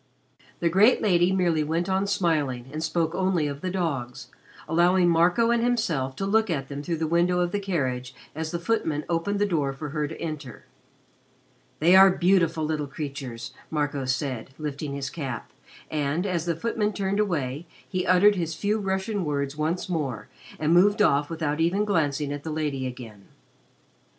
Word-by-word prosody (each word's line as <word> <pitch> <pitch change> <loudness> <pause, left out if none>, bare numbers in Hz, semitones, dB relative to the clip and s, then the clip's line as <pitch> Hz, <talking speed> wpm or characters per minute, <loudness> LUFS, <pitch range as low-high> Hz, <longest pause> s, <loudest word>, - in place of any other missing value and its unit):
The 170 - +2
great 200 +9 +5
lady 180 -3 +3
merely 175 -5 +2
went 165 +3 -1
on 190 +1 0
smiling, 150 -10 0
and 155 +1 -3
spoke 165 0 0
only 185 -4 +1
of 140 0 -4
the 185 - -2
dogs, 135 -8 -3 0.4
allowing 175 +2 +3
Marco 175 +7 +3
and 235 -1 +2
himself 165 - 0
to 195 - -3
look 220 +2 +2
at 135 -5 -2
them 140 0 -5
through 165 +2 -2
the 160 - -1
window 175 +2 +2
of 175 -1 0
the 205 - -1
carriage 130 -10 -2 0.2
as 160 +1 -4
the 170 - -2
footman 165 -6 -1
opened 170 +4 -1
the 205 - +2
door 150 -8 0
for 150 +2 -6
her 150 0 -2
to 160 - -9
enter. 150 -6 -6 1.1
"They 170 +4 +5
are 195 +1 +9
beautiful 175 -3 +2
little 150 -2 -2
creatures," 135 -5 -6 0.2
Marco 145 -3 -1
said, 130 -2 -2
lifting 145 -1 -4
his 140 0 -4
cap, 135 -8 -5 0.4
and, 150 +4 -1
as 175 -4 -1
the 170 - +1
footman 210 +3 -1
turned 195 0 -1
away, 160 -6 -1 0.2
he 185 -1 -2
uttered 185 +3 +6
his 165 -4 -3
few 210 +5 0
Russian 195 +1 -1
words 140 -2 -2
once 160 +4 -1
more 145 - -3 0.3
and 155 +2 +1
moved 205 +4 +5
off 145 +1 +2
without 160 -2 -2
even 180 +6 +2
glancing 150 -7 0
at 145 - -5
the 160 - -6
lady 150 -4 -2
again. 115 -5 -9
160 Hz, 175 wpm, -26 LUFS, 145-185 Hz, 1.1 s, are